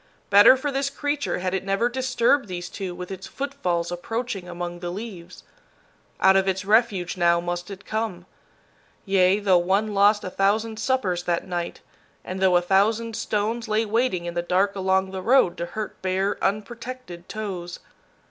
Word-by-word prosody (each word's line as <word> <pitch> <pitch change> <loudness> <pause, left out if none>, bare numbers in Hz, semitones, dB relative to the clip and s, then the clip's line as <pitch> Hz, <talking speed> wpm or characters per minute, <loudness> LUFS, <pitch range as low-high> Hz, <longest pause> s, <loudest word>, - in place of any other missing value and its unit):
Better 205 +6 +8
for 285 +2 -2
this 275 +1 -1
creature 290 +1 -2
had 185 0 -2
it 190 - -1
never 195 +4 +1
disturbed 255 0 +1
these 175 -1 -5
two 185 -3 -5
with 180 +1 -7
its 190 0 -7
footfalls 180 -12 -2
approaching 195 +1 -4
among 175 0 -5
the 175 0 -4
leaves. 180 -3 -8 0.8
Out 190 0 +5
of 195 0 +3
its 190 0 -1
refuge 205 -4 +2
now 170 -1 +3
must 175 +1 -4
it 195 0 -9
come. 215 -5 -3 0.8
Yea, 195 -1 +4
though 195 -4 +3
one 195 +4 0
lost 205 +1 +4
a 185 - -5
thousand 215 +3 0
suppers 205 -10 0
that 170 +1 -1
night, 175 -2 -4 0.4
and 185 +1 -5
though 190 -1 +4
a 175 - 0
thousand 215 +5 +2
stones 225 +3 -2
lay 220 +1 +1
waiting 220 -5 0
in 170 - -4
the 175 - -1
dark 190 +3 +1
along 190 0 +1
the 190 -1 -5
road 240 -4 +4
to 170 - -3
hurt 215 +3 -6
bare, 190 +2 -1
unprotected 215 -3 -4
toes. 185 -5 -5
195 Hz, 170 wpm, -24 LUFS, 180-225 Hz, 0.8 s, Better